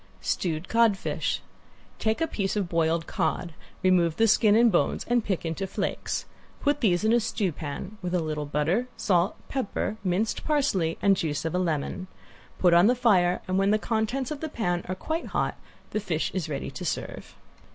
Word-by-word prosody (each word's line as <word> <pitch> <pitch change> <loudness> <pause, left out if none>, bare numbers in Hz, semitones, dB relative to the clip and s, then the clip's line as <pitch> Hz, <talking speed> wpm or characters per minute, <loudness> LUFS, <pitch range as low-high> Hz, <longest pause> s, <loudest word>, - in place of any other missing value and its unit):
~STEWED 165 -1 -1
CODFISH~ 225 -4 +1 0.6
Take 220 +7 0
a 325 - +2
piece 195 -10 -2
of 200 -3 0
boiled 165 -1 +1
cod, 160 +1 -2 0.3
remove 175 -3 +3
the 225 - +4
skin 215 0 +5
and 235 0 +5
bones 175 - +1
and 240 -1 +2
pick 190 -5 -2
into 165 +4 -2
flakes. 190 - -3 0.3
Put 290 -1 +1
these 185 -5 +2
in 220 +1 +3
a 240 - +5
stewpan, 190 -1 -3
with 180 0 -2
a - - +3
little 155 -2 -3
butter, 160 +12 0
salt, 180 -2 +2
pepper, 220 -4 -2
minced 190 +4 0
parsley 235 - +1
and 200 -1 +5
juice 150 -4 -2
of 160 - -1
a 180 - +1
lemon. 170 +1 -2 0.5
Put 180 -2 +4
on 175 +3 +7
the 250 - +4
fire 185 -8 +3
and 185 +1 +1
when 195 0 +3
the 215 - +4
contents 230 +5 -1
of 300 - -4
the 315 - -4
pan 175 -10 -1
are 185 - -1
quite 320 - -3
hot - - 0 0.4
the 215 - 0
fish 175 -6 -2
is 175 -5 -2
ready 140 -2 -4
to - - -7
serve. - - -4
190 Hz, 185 wpm, -27 LUFS, 170-220 Hz, 0.6 s, on